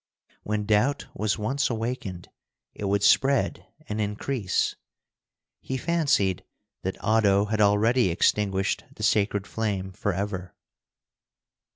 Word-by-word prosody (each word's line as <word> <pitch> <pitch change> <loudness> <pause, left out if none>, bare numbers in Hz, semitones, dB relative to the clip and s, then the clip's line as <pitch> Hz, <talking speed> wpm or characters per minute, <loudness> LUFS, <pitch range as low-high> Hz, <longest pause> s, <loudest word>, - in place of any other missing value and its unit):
When 105 0 -2
doubt 110 +7 +2
was 105 -1 -1
once 135 +6 0
awakened, 110 -6 -4 0.4
it 105 - -6
would 100 +1 +1
spread 135 +5 +3 0.2
and 110 -3 -2
increase. 105 +1 -1 0.8
He 130 - -4
fancied 140 - +1 0.4
that 95 - -3
Oddo 105 -2 +3
had 110 0 -1
already 105 +2 +4
extinguished 95 +2 +1
the - - -7
sacred 100 -1 +2
flame 100 -4 -3
forever. 95 -2 -3
105 Hz, 105 wpm, -26 LUFS, 100-115 Hz, 0.8 s, already